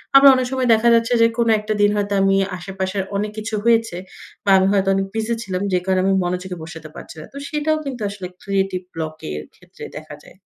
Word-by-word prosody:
আবার 275 0 +10
অনেক 255 -1 0
সময় 260 -1 0
দেখা 225 +1 +3
যাচ্ছে 230 +1 +1
যে 230 - +7
কোন 235 -1 +2
একটা 210 +1 -2
দিন 205 - +5
হয়তো 205 0 -1
আমি 195 0 +3 0.2
আশেপাশের 190 +1 -3
অনেক 210 +1 -1
কিছু 215 0 -3
হয়েছে 225 -5 +2 0.5
বা - - +1
আমি 190 0 +3
হয়তো 195 -1 +2
অনেক 195 0 0
বিজি 220 +1 -1
ছিলাম 185 -3 -3
যে 180 - +3
কারণে 190 -1 +2
আমি 195 - +3
মনোযোগে 180 +1 -3
বসাতে 160 -1 -9
পারছি - - -10
না। 155 - -8
তো - - -9
সেটাও 305 +1 0
কিন্তু 260 -4 -5
আসলে 200 -2 -7 0.2
ক্রিয়েটিভ 195 -2 -1
ব্লক 155 -1 -4 0.2
এর 75 0 -5
ক্ষেত্রে - - -15
দেখা - - -9
যায়। - - -17
200 Hz, 215 wpm, -20 LUFS, 185-230 Hz, 0.5 s, আবার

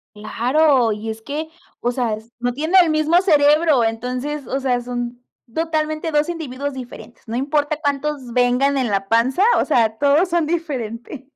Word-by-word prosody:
Claro, 245 +4 +2
y 215 +1 -4
es 220 0 -6
que, 300 +5 -4 0.3
o 245 +1 -1
sea, 235 -4 -1
es 220 +2 -11
no 245 0 0
tienen 325 +7 +4
el 330 - 0
mismo 310 +3 +3
cerebro, 300 - +4
entonces, 250 +6 -3
o 270 - -1
sea, 255 -2 0
son 245 0 -5 0.3
totalmente 315 0 -1
dos 300 +1 +1
individuos 285 -4 -4
diferentes. 240 -3 -10
No 230 - -3
importa 290 +3 0
cuántos 285 -3 -2
vengan 250 +3 +2
en 255 -3 0
la 195 -1 -1
panza, 255 - +2 0.2
o - - +1
sea, 225 -6 +1
todos 290 +6 +3
son 340 -2 +1
diferentes. 270 -6 -4
270 Hz, 170 wpm, -20 LUFS, 240-305 Hz, 0.3 s, tienen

